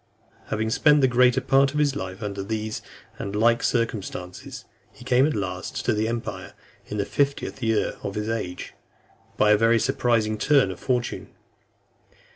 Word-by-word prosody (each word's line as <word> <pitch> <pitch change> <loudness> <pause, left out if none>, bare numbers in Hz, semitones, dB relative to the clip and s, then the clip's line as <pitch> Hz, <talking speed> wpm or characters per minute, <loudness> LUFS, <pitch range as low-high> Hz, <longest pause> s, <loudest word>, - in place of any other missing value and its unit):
X. - - -22
Having 110 +1 -1
spent 150 +4 +4
the 130 - +5
greater 125 0 +4
part 135 +1 +3
of - - -3
his 145 -2 +2
life 95 +2 -6
under 100 -1 -4
these 110 +1 -4 0.4
and 100 - -4
the - - -2
like 115 +2 +3
circumstances, 100 -6 -3 0.3
he - - -15
came 130 +3 +4
at 155 - -2
last 95 -3 -4
to 120 - +2
the 110 +1 0
empire 115 0 -5 0.3
in 105 - -5
the 100 - 0
fiftieth 140 0 -1
year 110 -2 0
of 100 - -5
his 105 0 -3
age, 110 -6 -4 0.6
by 105 - +4
a 105 - +6
very 115 +2 +4
surprising 110 -2 +1
turn 135 -8 +3
of 95 - -9
fortune. 125 -2 -2
110 Hz, 175 wpm, -24 LUFS, 105-125 Hz, 0.6 s, a